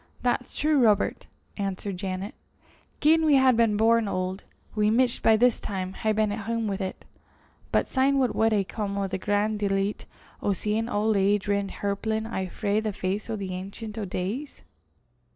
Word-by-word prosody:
"That's 250 0 -1
true, 300 -1 +3
Robert," 210 -4 +2 0.3
answered 195 -1 -3
Janet. 190 +3 -4 0.7
"Gien 320 +2 +5
we 305 -2 +5
had 260 -2 +5
been 225 -2 +3
born 225 0 +3
auld, 185 0 -3 0.3
we 210 -1 +2
micht 240 +2 +2
by 220 -1 +5
this 245 +1 +3
time 190 -2 -4
hae 220 - -1
been 215 -1 +1
at 205 0 -5
hame 230 -1 -1
wi' 195 -1 -1
't. 190 -2 -3 0.8
But - - +2
syne 275 +1 +2
what 255 -3 +2
wad 225 0 +2
hae 205 -2 +2
come 200 0 -4
o' 200 - 0
the 190 0 -3
gran' 205 +2 0
delicht 195 0 -1 0.3
o' 205 - +1
seein' 215 +4 -1
auld 210 0 +1
age 200 +1 +2
rin 200 -1 0
hirplin 220 +3 -2
awa 190 -5 -3
frae 205 +2 0
the 220 -1 -2
face 190 +4 -3
o' 225 - -1
the 195 -3 -5
Auncient 200 +4 -6
o' 220 -2 -3
Days?" 200 +11 -4
210 Hz, 185 wpm, -26 LUFS, 195-230 Hz, 0.8 s, Gien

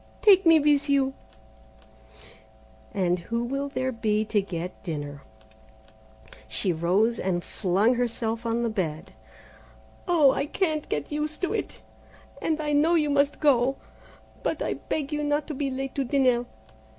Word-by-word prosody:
Take 385 -4 +6
me 325 -1 +7
with 290 0 +2
you!" 270 -1 +2 1.8
"And 180 -4 0
who 230 +7 -3
will 275 +3 -3
there 260 -1 -2
be 215 -2 0
to 210 -1 +1
get 180 -2 -6
dinner?" 145 -4 -5 1.3
She 110 - +1
rose 190 +8 +1
and 175 -2 -1
flung 200 +6 +1
herself 230 -1 -2
on 230 0 -1
the 235 - 0
bed. 185 -2 -3 0.9
"Oh, 315 -6 +5
I 280 - -2
can't 310 -3 -1
get 145 - -3
used 300 +3 -2
to 365 - 0
it, - - -4 0.6
and 315 -1 0
I 300 -1 -1
know 315 +4 +4
you 300 -3 +2
must 280 0 +2
go, 270 -3 +3 0.7
but - - -2
I - - -1
beg 295 -1 -4
you 300 0 -1
not 290 0 0
to - - -3
be 275 0 -2
late 270 0 -4
to 275 - -1
dinner. 250 -2 +2
255 Hz, 150 wpm, -26 LUFS, 200-290 Hz, 1.8 s, me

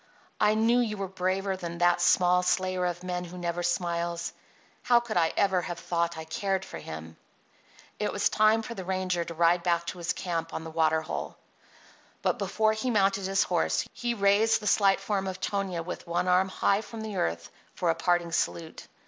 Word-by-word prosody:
"I 210 0 +4
knew 230 +3 +3
you 220 -3 -1
were 195 -1 -3
braver 190 +1 -1
than 170 -2 -6
that 175 0 +3
small 180 0 +4
slayer 185 0 0
of 175 0 -4
men 180 -1 -3
who 180 +1 -9
never 175 0 -2
smiles. 170 -1 -1 0.5
How 240 -1 +4
could 235 -2 -6
I 165 -2 +3
ever 190 -3 +3
have 175 -1 -5
thought 170 0 -1
I 160 - -5
cared 190 +4 -2
for - - -8
him?" 80 +1 -8 0.8
It - - 0
was - - +1
time 215 +1 +3
for 235 - -6
the 190 - -6
ranger 185 -1 -1
to 170 0 -8
ride 170 +1 +3
back 170 -1 +1
to 180 - -12
his 170 - -1
camp 165 -2 -3
on - - -4
the 160 - -7
water 160 0 +2
hole. 155 - -5 0.9
Before 220 0 +1
he 220 +4 -2
mounted 195 -3 +2
his 195 0 +2
horse 80 0 0
he 240 -1 -2
raised 205 +2 +3
the 210 - -10
slight 195 -1 +4
form 195 -1 -2
of 185 0 -5
Tonia 190 -5 -2
with 180 +1 -7
one 170 +2 0
arm 180 +1 +3
high 200 +2 +1
from 225 +1 -8
the 215 -3 -5
earth 85 0 -2 0.2
for 175 -2 +1
a - - +1
parting 170 0 0
salute. 165 -1 -2
180 Hz, 200 wpm, -28 LUFS, 170-200 Hz, 0.9 s, I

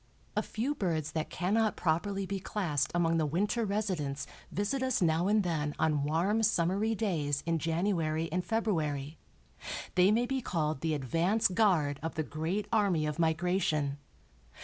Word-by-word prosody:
A - - +2
few 245 +7 -2
birds 160 - -1
that 155 -1 -2
cannot 210 +3 +1
properly 195 +4 0
be 195 +1 -3
classed 155 -8 -1
among 165 -1 +2
the 160 - +2
winter 205 +9 0
residents 185 -9 -2 0.3
visit 205 - -1
us 260 -2 +1
now 170 +1 +2
and 210 0 +3
then 150 -4 -1
on 155 -2 +1
warm 175 +9 +1
summery 205 +2 +2
days 155 -10 -1
in 165 -1 +1
January 165 -1 0
and 180 +2 0
February; 160 -9 -1 0.7
they 180 +1 +5
may 235 +3 +3
be 265 +1 -1
called 155 - -1
the 160 -2 0
advance 170 - +2
guard 180 -8 +2
of 165 +1 -4
the 155 - 0
great 165 +8 -3
army 195 -8 +2
of 150 +1 -3
migration. 160 -3 +1
170 Hz, 155 wpm, -31 LUFS, 155-205 Hz, 0.7 s, they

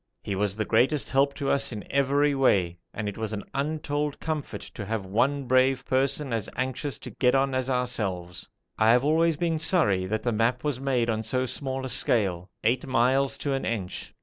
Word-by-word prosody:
He 100 - -3
was 100 0 0
the 110 0 -2
greatest 135 +3 +2
help 140 +1 +2
to 140 -2 -1
us 140 -1 +1
in 105 -3 -6
every 140 +1 +2
way, 95 -10 +2
and 105 -1 -4
it 105 +1 -5
was 110 -1 -3
an 105 -2 -4
untold 150 0 -2
comfort 155 -3 -4
to 105 - -8
have 105 -1 -3
one 130 +9 +1
brave 130 +1 +2
person 135 0 0
as 110 -4 -2
anxious 130 +2 -2
to - - -9
get 125 0 +2
on 135 0 +2
as 130 0 -1
ourselves. 100 -9 -2 0.3
I 110 - +5
have 125 +3 +4
always 160 +1 +3
been 165 -1 0
sorry 100 - +2
that 110 +3 -2
the 120 - +1
map 115 +3 +1
was 145 -4 -1
made 130 -4 +1
on 110 0 -1
so 130 +4 0
small 130 0 -3
a - - -4
scale 100 -8 +1
eight 120 +3 +1
miles 130 +2 +2
to 140 - +1
an 135 - -2
inch. 100 -6 -4
130 Hz, 200 wpm, -26 LUFS, 110-140 Hz, 0.3 s, I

